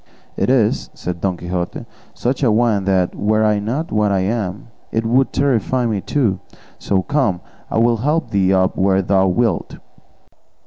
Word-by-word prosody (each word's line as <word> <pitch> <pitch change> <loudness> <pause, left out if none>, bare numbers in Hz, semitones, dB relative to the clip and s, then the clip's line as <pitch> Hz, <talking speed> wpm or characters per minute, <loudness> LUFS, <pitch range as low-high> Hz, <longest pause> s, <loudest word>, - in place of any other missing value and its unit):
"It - - 0
is," 120 -5 +2
said 90 -2 -5
Don 95 -2 -1
Quixote, 85 0 -4 0.3
"such 125 +4 -2
a 125 -5 +3
one 110 -3 +2
that 95 -2 +1
were 110 +1 +1
I 105 -1 +2
not 125 +11 -3
what 105 -1 +1
I 95 -1 +1
am 100 0 -3 0.2
it 115 0 -1
would 130 +4 +2
terrify 130 -2 +1
me 105 -4 -1
too; 110 -9 0 0.4
so, 95 -2 0
come, 130 -10 0 0.3
I - - -2
will 115 +1 +3
help 150 +8 -1
thee 95 -2 +2
up 95 -1 +2
where 95 0 +2
thou 95 0 +2
wilt." 100 0 0
105 Hz, 170 wpm, -19 LUFS, 95-120 Hz, 0.4 s, a